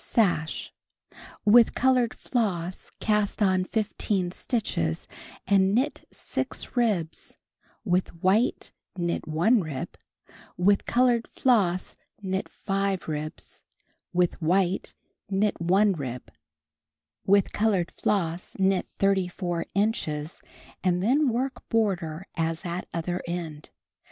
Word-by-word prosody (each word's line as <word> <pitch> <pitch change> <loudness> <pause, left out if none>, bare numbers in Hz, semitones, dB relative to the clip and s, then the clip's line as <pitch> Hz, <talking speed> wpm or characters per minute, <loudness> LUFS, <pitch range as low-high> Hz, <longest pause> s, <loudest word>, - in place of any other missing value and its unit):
Sash. 175 -8 0 0.7
With 230 +2 +6
colored 255 -2 +3
floss 185 -7 -2
cast 210 -2 +1
on 185 -3 +3
15 200 -3 -1
stitches 85 - -1 0.4
and 195 0 +3
knit 260 +5 -1
6 - - -4
ribs, 205 -10 -1 0.5
with 180 -2 +2
white 190 +8 +1 0.3
knit 175 -1 -2
1 185 +9 +3
rib, 150 -6 -5 0.6
with 195 +3 +3
colored 240 -1 +3
floss 195 -8 +1 0.2
knit 190 -1 -3
5 195 -2 -2
ribs, 155 0 -6 0.5
with 175 -1 +1
white 180 +3 +1 0.3
knit 200 -1 0
1 195 +4 +4
rib, 130 -6 -6 1.0
with 200 0 +4
colored 205 -5 +1
floss 175 -4 -1
knit 190 -1 +2
34 180 -3 0
inches 165 -7 -1 0.4
anci 180 -1 +2
then 270 +8 +3
work 255 +3 -3
border 190 -7 0
as 165 +1 -2
at 175 +1 -4
other 175 +2 -2
end. 165 -4 -5
190 Hz, 105 wpm, -26 LUFS, 170-210 Hz, 1.0 s, With